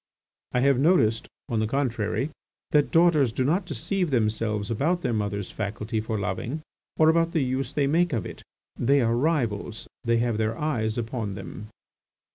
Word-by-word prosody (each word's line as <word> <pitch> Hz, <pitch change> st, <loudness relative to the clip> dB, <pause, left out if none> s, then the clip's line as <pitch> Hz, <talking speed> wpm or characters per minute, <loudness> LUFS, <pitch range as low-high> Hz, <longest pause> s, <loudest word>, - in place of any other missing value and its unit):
I 125 Hz, -, +2 dB
have 135 Hz, -1 st, +4 dB
noticed, 130 Hz, -9 st, +3 dB, 0.2 s
on 115 Hz, -, -1 dB
the 110 Hz, -, +1 dB
contrary, 130 Hz, +2 st, -1 dB, 0.4 s
that 145 Hz, -1 st, +3 dB
daughters 165 Hz, -7 st, +4 dB
do 130 Hz, -, -1 dB
not 175 Hz, +7 st, +1 dB
deceive 185 Hz, -1 st, -1 dB
themselves 110 Hz, -3 st, 0 dB
about 165 Hz, +10 st, +1 dB
their 125 Hz, -3 st, 0 dB
mothers' 105 Hz, -2 st, -2 dB
faculty 110 Hz, +2 st, -3 dB
for 110 Hz, -1 st, -3 dB
loving 115 Hz, +10 st, -3 dB, 0.3 s
or 155 Hz, -, +5 dB
about 165 Hz, +1 st, +3 dB
the 160 Hz, -, +2 dB
use 130 Hz, +1 st, -2 dB
they 145 Hz, -1 st, +1 dB
make 170 Hz, +5 st, +2 dB
of 115 Hz, -6 st, -1 dB
it; -, -, -8 dB, 0.4 s
they 140 Hz, +4 st, +4 dB
are 115 Hz, 0 st, +2 dB
rivals; 120 Hz, -6 st, -1 dB, 0.2 s
they 115 Hz, 0 st, +2 dB
have 115 Hz, -2 st, 0 dB
their 110 Hz, +1 st, 0 dB
eyes 115 Hz, -8 st, -1 dB
upon 115 Hz, -3 st, -3 dB
them." 105 Hz, +1 st, -8 dB
120 Hz, 170 wpm, -26 LUFS, 110-150 Hz, 0.4 s, or